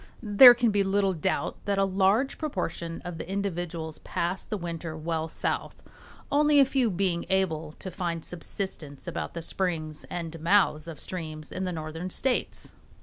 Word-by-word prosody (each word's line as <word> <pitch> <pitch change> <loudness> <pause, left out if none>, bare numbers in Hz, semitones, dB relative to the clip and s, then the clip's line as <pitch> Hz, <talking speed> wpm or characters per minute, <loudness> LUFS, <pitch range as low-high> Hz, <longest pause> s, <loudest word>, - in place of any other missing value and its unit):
There 240 +4 +9
can 235 -2 +2
be 200 -1 +2
little 195 0 +2
doubt 180 +3 -1
that 200 -1 0
a 195 - +4
large 195 +7 +2
proportion 170 - -3
of 175 -2 -6
the - - -6
individuals 175 -5 -3
pass 175 +3 -2
the 210 - -3
winter 165 -2 -5
well 160 0 -2
south, - - -3 0.5
only 295 0 +5
a 275 - +8
few 260 -3 +1
being 180 -2 0
able 160 -5 0
to 185 - -8
find 170 -4 -3
subsistence 165 -5 -5
about - - -4
the 170 - -2
springs 155 -5 -1
and 165 -2 -5
mouths 170 -2 +3
of 160 -4 -8
streams 155 -4 -6
in 185 - -3
the 180 - -2
northern 160 +2 -5
states. 255 +6 -1
175 Hz, 165 wpm, -27 LUFS, 160-200 Hz, 0.5 s, There